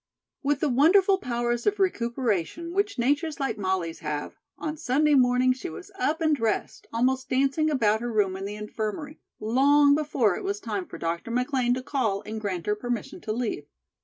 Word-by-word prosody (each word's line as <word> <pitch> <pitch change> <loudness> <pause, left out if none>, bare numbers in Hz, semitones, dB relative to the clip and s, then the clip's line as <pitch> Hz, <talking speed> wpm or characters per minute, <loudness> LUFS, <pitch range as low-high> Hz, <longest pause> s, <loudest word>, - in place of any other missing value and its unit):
With 285 -1 0
the 305 - +2
wonderful 370 +9 +5
powers 240 - -1
of 415 0 +2
recuperation 245 - -1
which 405 -1 0
natures 290 +5 0
like 235 -6 -2
Molly's 185 -4 -1
have, 150 -1 -4 0.2
on 310 0 -4
Sunday 300 +1 +2
morning 255 -1 +4
she 265 +8 -6
was 370 +4 -10
up 320 -3 0
and 310 -2 +3
dressed, 225 -5 -2
almost 260 +3 0
dancing 275 +4 +2
about 220 -7 +2
her 240 0 -3
room 200 -4 +1
in 195 +1 -5
the 205 +1 -5
infirmary, 215 +8 -5 0.2
long 285 +6 +4
before 280 -10 +1
it - - -6
was 400 +1 -2
time 380 -2 -4
for - - -9
Dr. 170 +6 -3
McLean 250 0 +1
to 255 - -5
call 220 -8 -1
and 220 0 -5
grant 185 -5 -3
her 210 - +2
permission 240 0 -4
to 215 - -4
leave. 215 -10 -3
250 Hz, 185 wpm, -26 LUFS, 215-300 Hz, 0.2 s, wonderful